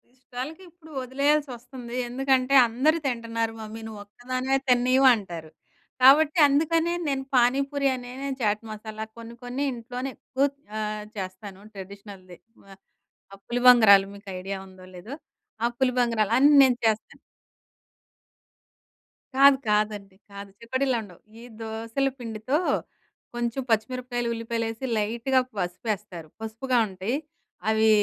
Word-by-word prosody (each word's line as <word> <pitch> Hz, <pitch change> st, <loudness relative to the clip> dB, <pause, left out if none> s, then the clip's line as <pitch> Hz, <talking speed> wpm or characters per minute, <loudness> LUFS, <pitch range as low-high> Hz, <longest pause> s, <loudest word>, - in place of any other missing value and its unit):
ఇష్టాలకిప్పుడు 315 Hz, +7 st, -9 dB
ఒదిలేయాల్సొస్తుంది. 260 Hz, -2 st, -2 dB
ఎందుకంటే 265 Hz, +1 st, +1 dB
"అందరూ 265 Hz, +8 st, +2 dB
తింటున్నారు 230 Hz, -2 st, -2 dB
మమ్మీ 220 Hz, +1 st, -8 dB
నువ్వొక్కదానివే 245 Hz, +5 st, -3 dB
తిన్నీయవు" 255 Hz, +2 st, +4 dB
అంటారు. 170 Hz, -7 st, -8 dB, 0.5 s
కాబట్టి 295 Hz, +5 st, +6 dB
అందుకనే 325 Hz, +4 st, +2 dB
నేను 270 Hz, -1 st, -1 dB
పానీపూరి 275 Hz, +3 st, +2 dB
అనే, 245 Hz, -1 st, -8 dB, 0.3 s
చాట్ 210 Hz, -1 st, +1 dB
మసాలా 215 Hz, 0 st, -7 dB
కొన్ని 230 Hz, 0 st, -9 dB
కొన్ని 250 Hz, +3 st, -3 dB
ఇంట్లోనే 245 Hz, +2 st, -5 dB
ఎక్కువ 265 Hz, +2 st, -1 dB, 0.3 s
ఆహ్, 215 Hz, 0 st, -3 dB
చేస్తాను 190 Hz, +1 st, -7 dB
ట్రెడిషనల్‌ది. 195 Hz, -2 st, -11 dB, 0.3 s
ఆహ్, 195 Hz, -, -13 dB, 0.6 s
ఆ -, -, -8 dB
పులి 245 Hz, +1 st, -1 dB
బంగరాలు 210 Hz, -6 st, +8 dB
మీకు 200 Hz, 0 st, -12 dB
ఐడియా 195 Hz, +1 st, -4 dB
ఉందో 185 Hz, -1 st, -15 dB
లేదో. 215 Hz, +10 st, -8 dB, 0.5 s
ఆ! -, -, +4 dB
పులి 260 Hz, -1 st, +2 dB
బంగరాలు 230 Hz, -3 st, +1 dB
అన్నీ 285 Hz, +3 st, +6 dB
నేను 255 Hz, -2 st, +3 dB
చేస్తాను. 220 Hz, -1 st, 0 dB, 2.2 s
కాదు. 275 Hz, 0 st, +7 dB
కాదండి. 210 Hz, -2 st, 0 dB, 0.2 s
కాదు 200 Hz, 0 st, -9 dB
చకోడిల్ల 260 Hz, +2 st, -1 dB
ఉండవు. 185 Hz, -5 st, -14 dB, 0.2 s
ఈ -, -, -12 dB, 0.2 s
దోసల 225 Hz, +4 st, -2 dB
పిండితో 230 Hz, +4 st, -2 dB, 0.8 s
కొంచెం 240 Hz, +2 st, -2 dB
పచ్చిమిరపకాయలు, 240 Hz, +2 st, -1 dB
ఉల్లిపాయలేసి 230 Hz, +1 st, -3 dB
లైట్‌గా 235 Hz, +5 st, +1 dB, 0.2 s
పసుపేస్తారు. 180 Hz, -1 st, -4 dB
పసుపుగా 225 Hz, +4 st, -2 dB
ఉంటయి. 190 Hz, +5 st, -3 dB, 0.5 s
అవి 220 Hz, 0 st, +3 dB
235 Hz, 115 wpm, -26 LUFS, 210-260 Hz, 2.2 s, బంగరాలు